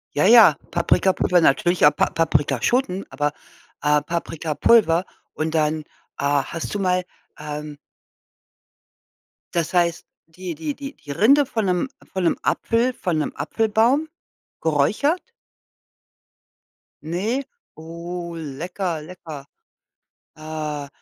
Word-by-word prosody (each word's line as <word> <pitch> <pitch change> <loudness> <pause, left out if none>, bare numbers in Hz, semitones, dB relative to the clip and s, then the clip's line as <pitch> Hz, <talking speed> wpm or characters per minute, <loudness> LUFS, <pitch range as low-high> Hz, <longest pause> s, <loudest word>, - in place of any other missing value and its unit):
Ja, 150 - +3
ja, 215 -8 +8
Paprikapulver 180 +1 +2
natürlich, 175 +4 +3
auch 150 0 +7
Pa - - +2
Paprikaschoten, 165 - 0
aber, 145 +2 -1 0.5
äh, 150 0 +3
Paprikapulver 165 +3 +2 0.3
und 160 +1 -2
dann, 155 0 +1 0.3
ah, 140 -1 +1
hast 165 +3 -4
du - - -1
mal, 180 -2 +1 0.3
ähm 150 0 -6 1.8
das 170 -2 -1
heißt, 170 -2 +1 0.2
die 175 +1 -7
die 155 -1 -4
die 280 0 -8
die 145 - -14
Rinde 270 - +4
von 225 -3 -2
'nem 180 +6 0 0.2
von 190 -1 -1
'nem 170 - +2
Apfel 235 +2 +1
von 180 -8 -2
'nem 150 - -1
Apfelbaum 225 +7 +1 0.5
geräuchert? 200 - +1 1.8
Ne, 200 - -1 0.3
oh, 170 +2 -7
lecker, 165 +3 -4
lecker. 155 -4 -10 0.9
Äh, 155 -2 -5
170 Hz, 110 wpm, -22 LUFS, 150-190 Hz, 1.8 s, ja